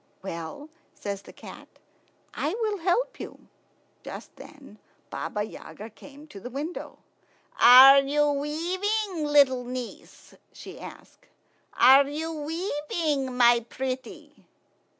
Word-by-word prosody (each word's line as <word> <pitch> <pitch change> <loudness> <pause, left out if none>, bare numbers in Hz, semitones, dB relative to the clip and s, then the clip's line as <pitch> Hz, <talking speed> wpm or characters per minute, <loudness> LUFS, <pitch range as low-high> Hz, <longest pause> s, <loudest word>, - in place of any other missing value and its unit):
"Well," 170 - -7 0.3
says 200 -1 -6
the - - -14
cat, - - -13 0.7
"I 320 +7 -2
will 425 -3 -2
help 365 +8 -1
you." - - -8 0.7
Just - - -10
then - - -15 0.3
Baba 210 - -4
Yaga 215 0 -10
came 285 +6 -15
to 200 - -11
the 245 - -8
window. 290 +7 -6 0.6
"Are 260 +3 +9
you 290 +2 +1
weaving, 350 +5 -2
little 275 -4 +4
niece?" 250 -1 -9 0.2
she - - -11
asked. - - -13 0.5
"Are 275 +2 +6
you 315 +3 -4
weaving, 300 -4 -3
my 240 -1 +5
pretty?" 260 0 -7
285 Hz, 110 wpm, -26 LUFS, 255-320 Hz, 0.7 s, Are